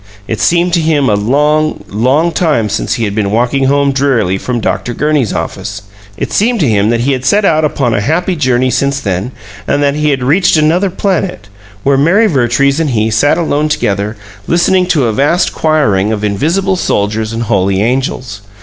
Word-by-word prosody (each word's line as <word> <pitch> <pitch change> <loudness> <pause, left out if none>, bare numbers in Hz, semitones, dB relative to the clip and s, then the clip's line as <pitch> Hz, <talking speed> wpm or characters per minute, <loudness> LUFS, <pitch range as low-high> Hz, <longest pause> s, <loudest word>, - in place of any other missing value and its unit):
It 110 - -3
seemed 175 +1 +2
to 170 - +2
him 155 -4 +1
a 105 - +2
long, 150 +5 0
long 130 +11 +1
time 150 -12 0
since - - -2
he 115 - -3
had 100 -2 -2
been 105 -2 -1
walking 125 +5 0
home 140 +1 +2
drearily 130 -9 0
from 125 +2 -3
Dr. 100 +3 -2
Gurney's 150 -7 0
office; 95 +4 -5 0.3
it - - -4
seemed 230 +3 +1
to 150 - +2
him 105 -2 +1
that 115 0 0
he 135 +4 0
had 130 -2 -2
set 200 +9 +2
out 155 -4 +2
upon 135 -5 0
a 105 - 0
happy 175 - 0
journey 130 -4 +1
since 140 +2 0
then, 100 0 -3 0.4
and 145 0 +1
that 140 -1 +2
he 150 +1 0
had 135 -3 -1
reached 170 +6 +3
another 165 +6 +2
planet, 180 - -2 0.3
where 140 0 +2
Mary 185 +10 +3
Vertrees 140 - +1
and 160 -3 0
he 110 -3 0
sat 145 +8 +2
alone 155 -3 0
together 105 -5 -2 0.3
listening 180 +2 +2
to 155 -8 +1
a 115 - 0
vast 150 - +1
choiring 110 -11 +1
of 105 -1 -3
invisible 165 - 0
soldiers 110 - -1
and 115 +1 -3
holy 100 -4 0
angels. 125 -4 -2
135 Hz, 195 wpm, -12 LUFS, 110-155 Hz, 0.4 s, reached